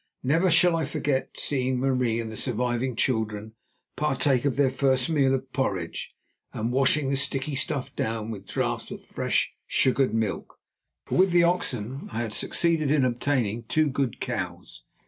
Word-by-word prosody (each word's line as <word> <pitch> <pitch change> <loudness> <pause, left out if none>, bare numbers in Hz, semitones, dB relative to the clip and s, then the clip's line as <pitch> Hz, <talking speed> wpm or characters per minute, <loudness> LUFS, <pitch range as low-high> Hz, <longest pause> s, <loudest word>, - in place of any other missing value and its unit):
Never 165 +8 +3
shall 175 +1 +5
I 165 - 0
forget 135 -1 -1
seeing 130 -2 0
Marie 125 -3 +1
and 115 -1 -4
the - - -7
surviving 125 +1 -1
children 110 -3 -1 0.4
partake 140 -3 +1
of 140 - +1
their 140 -2 +3
first 130 +1 +1
meal 140 -4 +3
of 130 0 -6
porridge, 95 -11 -2 0.4
and 115 +2 -2
washing 135 +2 +2
the - - +2
sticky 140 +1 0
stuff 135 0 -2
down 110 0 -2
with 100 -3 -8
draughts - - -2
of - - -9
fresh, - - 0
sugared 130 0 +2
milk, 110 -3 -2 0.5
for - - -1
with 190 +1 +5
the 175 0 +4
oxen 135 - -1
I 115 +1 -2
had 110 -2 -4
succeeded 165 +1 +1
in 145 -3 +3
obtaining 120 -3 0
two 155 +5 +2
good 130 -3 -2
cows. - - -5
130 Hz, 165 wpm, -26 LUFS, 115-140 Hz, 0.5 s, shall